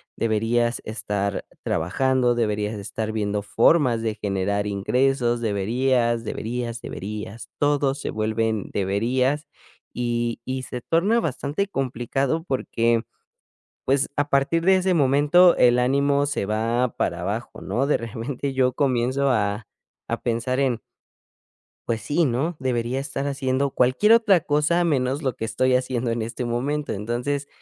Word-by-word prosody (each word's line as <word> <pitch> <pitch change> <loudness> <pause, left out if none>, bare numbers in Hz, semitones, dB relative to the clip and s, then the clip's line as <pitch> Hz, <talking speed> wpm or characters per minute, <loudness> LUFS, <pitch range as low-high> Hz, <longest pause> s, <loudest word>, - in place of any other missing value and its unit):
deberías 115 +2 0
estar 105 -2 -3 0.2
trabajando, 125 +8 +1
deberías 105 -2 -1
de - - -6
estar 110 +2 -4
viendo 105 -1 -1
formas 120 +2 +3
de 110 -1 -2
generar 100 +1 -1
ingresos". 120 +4 +1
Deberías, 115 +3 +1
deberías, 115 +1 -4
deberías. 105 +2 -7
Todo 145 -2 +2
se 140 - -5
vuelven 110 -1 -1
"deberías", 125 +9 0 0.5
y 120 -1 -2
y 130 0 -3
se 125 0 -6
torna 190 - +2
bastante 150 - -2
complicado 135 - -1
porque, 115 -6 0 0.8
pues 135 +1 +2
a 145 0 0
partir 140 +5 +2
de 190 +1 +5
ese 185 0 +1
momento 150 +5 +5
el 120 0 +5
ánimo 140 +3 +2
se 140 -8 -2
va 115 +4 0
para 85 - -1
abajo, 105 +6 -4
¿no?, 135 +3 -1
de 145 - +2
repente 120 +4 -4
yo 130 -1 +2
comienzo 135 0 +1
a 105 -3 0 0.4
a - - -3
pensar 120 +3 -1
en 125 -4 +1 1.1
Pues, 115 -1 -1
sí, 150 +9 +1
¿no?, 140 +7 -1
debería 125 0 -1
estar 135 0 -4
haciendo 135 0 0
cualquier 130 - +4
otra 215 -6 +5
cosa, 150 +4 +2
menos 140 -2 0
lo 130 -3 -1
que 110 - -4
estoy 130 +3 +1
haciendo 125 -2 -1
en 115 0 -1
este 115 +2 -4
momento. 140 +5 -2
Entonces, 120 +7 -2
125 Hz, 140 wpm, -23 LUFS, 115-140 Hz, 1.1 s, de